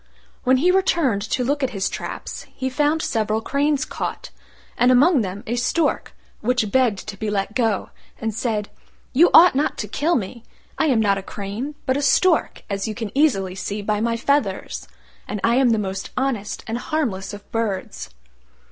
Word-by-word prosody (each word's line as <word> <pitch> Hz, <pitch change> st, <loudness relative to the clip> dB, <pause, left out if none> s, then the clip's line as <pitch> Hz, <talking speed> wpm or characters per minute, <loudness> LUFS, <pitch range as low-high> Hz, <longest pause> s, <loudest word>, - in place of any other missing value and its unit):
When 260 Hz, +1 st, +5 dB
he 350 Hz, +7 st, +4 dB
returned 335 Hz, -, +2 dB
to 250 Hz, -, 0 dB
look 285 Hz, +4 st, 0 dB
at 265 Hz, -, +1 dB
his 190 Hz, -, 0 dB
traps -, -, -6 dB
he 260 Hz, 0 st, -3 dB
found 300 Hz, +4 st, +1 dB
several 215 Hz, -1 st, 0 dB
cranes 280 Hz, +4 st, 0 dB
caught, -, -, -5 dB, 0.4 s
and 245 Hz, +1 st, +4 dB
among 280 Hz, +3 st, +5 dB
them 195 Hz, 0 st, -5 dB
a 235 Hz, -, -2 dB
Stork, 290 Hz, +6 st, 0 dB, 0.2 s
which 230 Hz, -2 st, 0 dB
begged 240 Hz, -6 st, +2 dB
to 210 Hz, -2 st, -7 dB
be 215 Hz, +1 st, -3 dB
let 205 Hz, 0 st, -1 dB
go, 225 Hz, -5 st, 0 dB, 0.3 s
and 225 Hz, -1 st, -2 dB
said, 220 Hz, -2 st, -2 dB, 0.4 s
"You 320 Hz, +7 st, +6 dB
ought 355 Hz, +2 st, +8 dB
not 285 Hz, +3 st, 0 dB
to 210 Hz, -, -3 dB
kill 310 Hz, -, 0 dB
me: 225 Hz, +2 st, -4 dB, 0.4 s
I -, -, +3 dB
am 255 Hz, -6 st, +3 dB
not 200 Hz, -2 st, +2 dB
a -, -, -6 dB
crane, 205 Hz, +9 st, -6 dB
but 260 Hz, 0 st, +1 dB
a -, -, -1 dB
Stork, 325 Hz, +4 st, +2 dB
as 195 Hz, 0 st, -2 dB
you 215 Hz, -, -4 dB
can 225 Hz, -4 st, -5 dB
easily 195 Hz, -11 st, +2 dB
see 205 Hz, +2 st, -4 dB
by 210 Hz, 0 st, 0 dB
my 230 Hz, 0 st, 0 dB
feathers, 235 Hz, -6 st, -1 dB, 0.4 s
and 210 Hz, -, -3 dB
I 235 Hz, +2 st, +3 dB
am 260 Hz, -2 st, +4 dB
the 225 Hz, -, +3 dB
most 195 Hz, -2 st, -3 dB
honest 240 Hz, -5 st, -2 dB
and 230 Hz, +2 st, -3 dB
harmless 240 Hz, -11 st, -2 dB
of 205 Hz, 0 st, -11 dB
birds." 220 Hz, -4 st, -3 dB
230 Hz, 185 wpm, -22 LUFS, 205-280 Hz, 0.4 s, ought